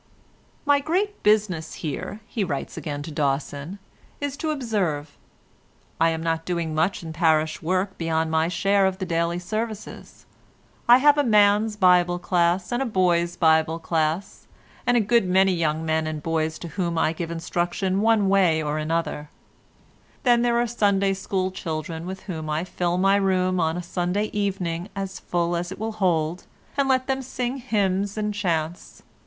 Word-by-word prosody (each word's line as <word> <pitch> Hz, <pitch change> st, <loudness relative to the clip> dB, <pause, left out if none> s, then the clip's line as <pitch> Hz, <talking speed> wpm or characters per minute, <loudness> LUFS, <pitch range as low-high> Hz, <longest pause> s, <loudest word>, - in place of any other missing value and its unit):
"My 285 Hz, -1 st, +4 dB
great 380 Hz, +8 st, -1 dB
business 205 Hz, -7 st, +1 dB
here," 165 Hz, +7 st, -5 dB
he 220 Hz, -2 st, -2 dB
writes 145 Hz, -7 st, -4 dB
again 145 Hz, -2 st, -5 dB
to 160 Hz, -, -7 dB
Dawson, 145 Hz, +4 st, -2 dB, 0.4 s
"is 285 Hz, -1 st, -3 dB
to 315 Hz, +1 st, -2 dB
observe. 195 Hz, -, -2 dB, 0.8 s
I 165 Hz, +1 st, +4 dB
am 160 Hz, 0 st, -3 dB
not 165 Hz, -1 st, -1 dB
doing 170 Hz, -2 st, -2 dB
much 165 Hz, +4 st, 0 dB
in 160 Hz, -1 st, -6 dB
parish 160 Hz, -2 st, +2 dB
work 185 Hz, +4 st, -1 dB
beyond 160 Hz, -1 st, 0 dB
my 160 Hz, 0 st, +2 dB
share 195 Hz, +3 st, +2 dB
of 190 Hz, -1 st, -2 dB
the 190 Hz, -, -3 dB
daily 170 Hz, 0 st, 0 dB
services. 215 Hz, +4 st, -6 dB, 0.6 s
I 240 Hz, -, +10 dB
have 290 Hz, +2 st, +5 dB
a -, -, +4 dB
man's 210 Hz, -2 st, +4 dB
Bible 180 Hz, -2 st, +4 dB
Class, 175 Hz, 0 st, +1 dB
and 240 Hz, +2 st, 0 dB
a -, -, +1 dB
boy's 175 Hz, -4 st, +1 dB
Bible 160 Hz, -1 st, +3 dB
Class, 165 Hz, +2 st, -2 dB, 0.4 s
and 245 Hz, -, +4 dB
a -, -, +4 dB
good 230 Hz, 0 st, +3 dB
many 190 Hz, +1 st, +4 dB
young 160 Hz, -2 st, 0 dB
men 160 Hz, 0 st, 0 dB
and 155 Hz, -2 st, -4 dB
boys 160 Hz, -1 st, -1 dB
to -, -, -6 dB
whom 170 Hz, 0 st, -2 dB
I 160 Hz, -, +2 dB
give 165 Hz, 0 st, -5 dB
instruction 175 Hz, +3 st, -1 dB
one 220 Hz, -2 st, +3 dB
way 190 Hz, -5 st, +3 dB
or 150 Hz, 0 st, -2 dB
another; 155 Hz, -1 st, -2 dB, 0.9 s
then 240 Hz, -2 st, +4 dB
there 240 Hz, -1 st, +2 dB
are 240 Hz, -, +2 dB
the -, -, -5 dB
Sunday 200 Hz, -2 st, +2 dB
School 190 Hz, -1 st, -2 dB
children, 160 Hz, -1 st, -5 dB
with 190 Hz, +1 st, -6 dB
whom 160 Hz, -5 st, -6 dB
I 155 Hz, +2 st, -1 dB
fill 175 Hz, -1 st, -1 dB
my 195 Hz, +2 st, +4 dB
room 185 Hz, -2 st, +1 dB
on 160 Hz, 0 st, +1 dB
a 180 Hz, -, -4 dB
Sunday 180 Hz, +4 st, -1 dB
evening 190 Hz, -3 st, -2 dB
as 195 Hz, -1 st, -4 dB
full 175 Hz, 0 st, -1 dB
as 175 Hz, +1 st, -3 dB
it 190 Hz, -, -6 dB
will 220 Hz, +2 st, -3 dB
hold, 175 Hz, -5 st, 0 dB, 0.3 s
and 280 Hz, -1 st, +1 dB
let 260 Hz, -1 st, +2 dB
them 270 Hz, 0 st, -1 dB
sing 255 Hz, 0 st, -3 dB
hymns 205 Hz, -5 st, -1 dB
and 210 Hz, 0 st, -1 dB
chants. 170 Hz, -4 st, -3 dB
180 Hz, 175 wpm, -24 LUFS, 160-205 Hz, 0.9 s, I